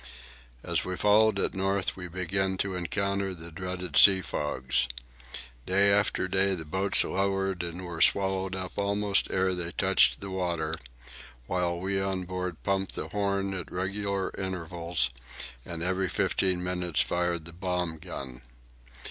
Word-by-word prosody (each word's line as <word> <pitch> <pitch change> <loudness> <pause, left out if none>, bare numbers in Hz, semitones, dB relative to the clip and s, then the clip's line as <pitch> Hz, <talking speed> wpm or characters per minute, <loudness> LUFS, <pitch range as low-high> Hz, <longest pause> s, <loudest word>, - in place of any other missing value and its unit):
As - - 0
we 90 - -3
followed 105 +1 +4
it - - +1
north 95 0 0
we 90 -2 -6
began 95 +2 0
to 100 0 -1
encounter 100 +2 -1
the 85 0 -9
dreaded 90 -1 -5
sea 95 -2 +8
fogs. 65 -5 +1 0.8
Day 100 +2 +4
after 100 -2 +2
day 95 +1 +2
the 80 -3 -7
boats 95 +6 +2
lowered 95 -1 -1
and 85 +1 -5
were 85 -2 -5
swallowed 95 +1 +3
up 95 +1 -5
almost 100 0 +1
ere 95 0 +1
they 90 -1 -3
touched - - +3
the 100 -1 -7
water, 85 -4 -2 0.7
while 85 +2 -1
we 95 +1 -1
on 95 -1 -1
board 90 -2 -5
pumped 95 -1 -1
the - - -4
horn 100 -1 -1
at 90 -3 -6
regular 100 +1 -2
intervals 85 -6 -1 0.6
and 85 -1 -4
every 95 +1 0
fifteen 90 0 +1
minutes 90 -3 0
fired 85 -2 -1
the 85 - -10
bomb 90 -2 -2
gun. 65 -4 -8
95 Hz, 150 wpm, -28 LUFS, 85-95 Hz, 0.8 s, sea